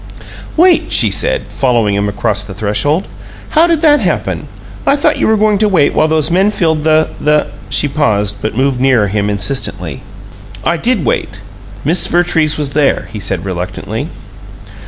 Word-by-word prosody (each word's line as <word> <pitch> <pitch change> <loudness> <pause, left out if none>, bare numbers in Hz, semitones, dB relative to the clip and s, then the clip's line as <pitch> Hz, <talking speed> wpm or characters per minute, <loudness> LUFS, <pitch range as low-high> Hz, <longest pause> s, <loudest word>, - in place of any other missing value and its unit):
"Wait!" 350 +1 +3
she - - +4
said, - - 0
following 120 -6 0
him 100 +1 0
across 105 0 -1
the 95 - -9
threshold. 130 - -1 0.4
"How 330 +2 +3
did 335 -3 +1
that 295 -3 +4
happen? - - -2 0.4
I 280 - +3
thought 285 - +1
you - - +1
were 220 0 +3
going 210 -1 +2
to 215 -1 +2
wait 160 -7 +2
while 155 - +2
those 155 0 0
men 190 +4 +3
filled 160 -7 0
the 155 0 +2
the 150 0 +1
" - - -18
She - - +3
paused, 105 -9 0
but 110 +1 -4
moved 130 -1 0
nearer 125 -6 +2
him 105 +1 -1
insistently. 100 - -1 0.6
"I 170 - 0
did 225 - 0
wait. 105 -2 -2 0.4
Miss 165 +5 +3
Vertrees 170 -3 +1
was 145 -2 -2
there," 145 -1 0
he 105 - -5
said, 95 -2 -3
reluctantly. 90 -1 -4
145 Hz, 175 wpm, -13 LUFS, -, 0.6 s, she